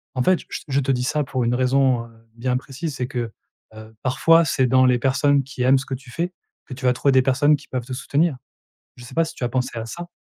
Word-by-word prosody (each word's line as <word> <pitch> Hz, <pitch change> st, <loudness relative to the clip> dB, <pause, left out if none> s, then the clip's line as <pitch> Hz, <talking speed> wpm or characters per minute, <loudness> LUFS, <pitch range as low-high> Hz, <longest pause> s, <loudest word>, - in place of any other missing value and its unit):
En 130 Hz, -, 0 dB
fait, 185 Hz, +6 st, +3 dB
je -, -, -13 dB, 0.2 s
je 140 Hz, 0 st, +1 dB
te 135 Hz, 0 st, 0 dB
dis 125 Hz, -1 st, 0 dB
ça 150 Hz, +3 st, 0 dB
pour 130 Hz, -1 st, -2 dB
une 120 Hz, +1 st, +1 dB
raison, 130 Hz, -1 st, +2 dB
heu, -, -, -15 dB, 0.3 s
bien 125 Hz, +1 st, -1 dB
précise 140 Hz, +4 st, -6 dB
c'est 125 Hz, -, -3 dB
que, 120 Hz, -4 st, -4 dB, 0.4 s
heu, 110 Hz, 0 st, -12 dB
parfois, 165 Hz, +6 st, +4 dB
c'est 130 Hz, -3 st, +1 dB
dans 130 Hz, +1 st, +4 dB
les 125 Hz, -1 st, +3 dB
personnes 140 Hz, +2 st, +2 dB
qui 130 Hz, -1 st, -8 dB
aiment 130 Hz, +1 st, +5 dB
ce -, -, -7 dB
que 135 Hz, -, -4 dB
tu 130 Hz, -1 st, -13 dB
fais 175 Hz, +5 st, -2 dB, 0.3 s
que 135 Hz, -, -9 dB
tu 130 Hz, 0 st, -7 dB
vas 125 Hz, -, +4 dB
trouver 140 Hz, +2 st, +1 dB
des 130 Hz, -, +5 dB
personnes 140 Hz, +3 st, +3 dB
qui -, -, -12 dB
peuvent 125 Hz, -2 st, -4 dB
te 130 Hz, -, -6 dB
soutenir. 140 Hz, +2 st, 0 dB, 0.6 s
Je 120 Hz, -, -13 dB
sais 125 Hz, -, -11 dB
pas 165 Hz, 0 st, +2 dB
si 160 Hz, -, -9 dB
tu -, -, -7 dB
as 120 Hz, -, 0 dB
pensé 125 Hz, -1 st, -2 dB
à 115 Hz, -, -4 dB
ça? 175 Hz, +9 st, -7 dB
130 Hz, 270 wpm, -22 LUFS, 125-140 Hz, 0.6 s, aiment